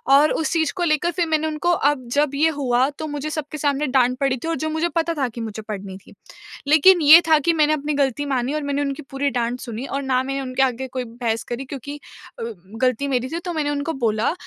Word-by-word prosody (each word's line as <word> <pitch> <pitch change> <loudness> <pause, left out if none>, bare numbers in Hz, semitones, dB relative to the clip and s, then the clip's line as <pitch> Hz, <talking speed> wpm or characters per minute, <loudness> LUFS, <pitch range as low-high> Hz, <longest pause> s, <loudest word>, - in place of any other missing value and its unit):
और 295 +2 +5
उस 315 - -1
चीज़ 320 -3 +1
को 360 - -2
लेकर 335 +1 +1
फिर 350 0 0
मैंने 315 -1 +1
उनको 310 +3 0 0.2
अब 260 -4 -6
जब 290 -1 +2
ये 310 +3 +3
हुआ 255 0 +2
तो 295 +2 -7
मुझे 295 0 -4
सबके 305 0 -5
सामने 290 0 0
डाँट 255 -1 +2
पड़ी 275 -2 +1
थी 290 - -6
और 330 - 0
जो 315 - -1
मुझे 320 +2 -1
पता 335 0 +1
था 270 -3 +1
कि 235 0 -8
मुझे 220 -1 -5
पड़नी 200 -3 -7
थी, 195 - -18 0.5
लेकिन 320 +5 +6
ये 315 +3 +9
था 315 -1 +6
कि 335 +4 +1
मैंने 305 -1 +3
अपनी 300 0 -2
गलती 280 0 0
मानी 265 -1 -1
और 305 -1 -2
मैंने 285 0 -1
उनकी 280 +1 -3
पूरी 275 +1 0
डाँट 245 -1 -2
सुनी 240 0 -6
और 275 0 -3
ना 260 -2 +1
मैंने 275 +1 -3
उनके 260 0 0
आगे 260 0 -1
कोई 255 0 -4
बहस 230 -1 -3
करी 245 +3 -4
क्योंकि 280 +1 -7 0.4
अ, - - -4 0.4
गलती 255 +2 +1
मेरी 255 -2 0
थी 330 - -3
तो 350 - -3
मैंने 305 -2 -1
उनको 290 +2 -2
बोला, 225 -1 0
280 Hz, 245 wpm, -22 LUFS, 255-310 Hz, 0.5 s, ये